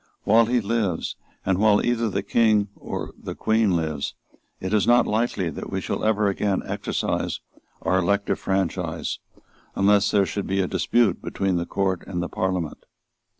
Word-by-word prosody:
While 115 +2 +5
he 125 0 +2
lives, 100 -5 -1 0.3
and 95 -1 +1
while 105 -1 +4
either 115 -2 +1
the - - -2
King 110 -3 +3
or - - -5
the - - -6
Queen 110 -4 +2
lives, 80 -4 -2 0.4
it 95 +2 -3
is 105 - +3
not 120 0 +5
likely 105 -6 0
that - - -7
we - - -1
shall - - -3
ever 105 -1 +2
again 100 0 0
exercise - - -2 0.4
our 95 0 +2
elective 100 +3 +1
franchise, 95 -3 -1 0.6
unless 100 0 +4
there 100 -2 +3
should 100 +1 -3
be 95 +1 0
a 95 - +2
dispute 110 +1 +1
between 95 -2 -1
the 85 0 -2
Court 95 -2 0
and 90 -3 -3
the 90 - -2
Parliament. 90 -4 -2
100 Hz, 165 wpm, -24 LUFS, 95-110 Hz, 0.6 s, While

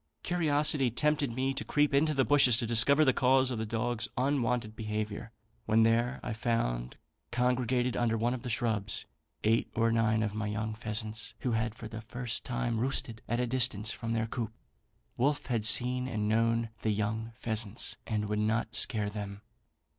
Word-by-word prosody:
Curiosity 150 -5 +2
tempted 145 +2 +1
me 130 +3 -1
to - - -3
creep 145 -1 +1
into 150 +2 +3
the 135 -1 +3
bushes 135 -5 +5
to 120 - -1
discover 130 +7 +5
the 130 - +4
cause 130 +1 +3
of 120 - -3
the 110 - -3
dog's 115 +1 -2
unwonted 125 -4 0
behaviour; 105 0 -4 0.4
when 110 +1 +4
there, 120 +3 +2
I 120 - -3
found, 60 - -2 0.3
congregated 125 0 +1
under 115 -2 +1
one 120 +3 0
of 130 - -5
the 125 - -5
shrubs, 110 -4 -1 0.4
eight 110 +1 +2
or 115 0 +2
nine 110 -1 +2
of 105 -1 -2
my 105 0 -3
young 110 +1 -3
pheasants, 110 -1 -2
who 125 - -1
had 110 0 -1
for 115 - -8
the 110 0 -7
first 120 +1 -4
time 120 -2 -2
roosted 120 -3 -2
at 120 +1 0
a 125 - +1
distance 120 -4 0
from 115 0 -4
their 115 -1 0
coop. 115 -1 -4 0.7
Wolfe 140 +4 +1
had 115 -4 -1
seen 125 +3 +4
and 105 -4 -2
known 115 +1 +1
the 110 - 0
young 110 +2 -2
pheasants, 110 -1 -1
and 105 -2 -1
would 105 0 -1
not 110 +1 0
scare 105 -1 +1
them. 100 0 -7
115 Hz, 180 wpm, -30 LUFS, 110-125 Hz, 0.7 s, bushes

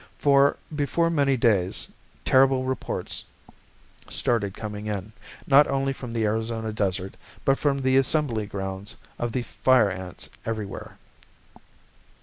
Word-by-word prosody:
For 140 0 +4 0.2
before 165 +3 +1
many 140 -4 +2
days 100 -6 +2 0.4
terrible 130 0 +4
reports 130 0 -3 0.9
started 105 -5 0
coming 105 -1 -6
in, 105 0 -4 0.3
not 145 +1 +6
only 135 0 0
from 125 -3 -8
the 115 -1 0
Arizona 110 +1 -1
desert 95 -2 -1 0.3
but 135 0 +3
from 140 -2 +2
the 130 0 +4
assembly 135 -6 +2
grounds 95 +2 -5 0.2
of 120 0 -1
the 125 +1 -1
Fire 125 -5 +3
Ants 90 -1 -7 0.2
everywhere. 110 -3 -5
115 Hz, 125 wpm, -25 LUFS, 105-135 Hz, 0.9 s, not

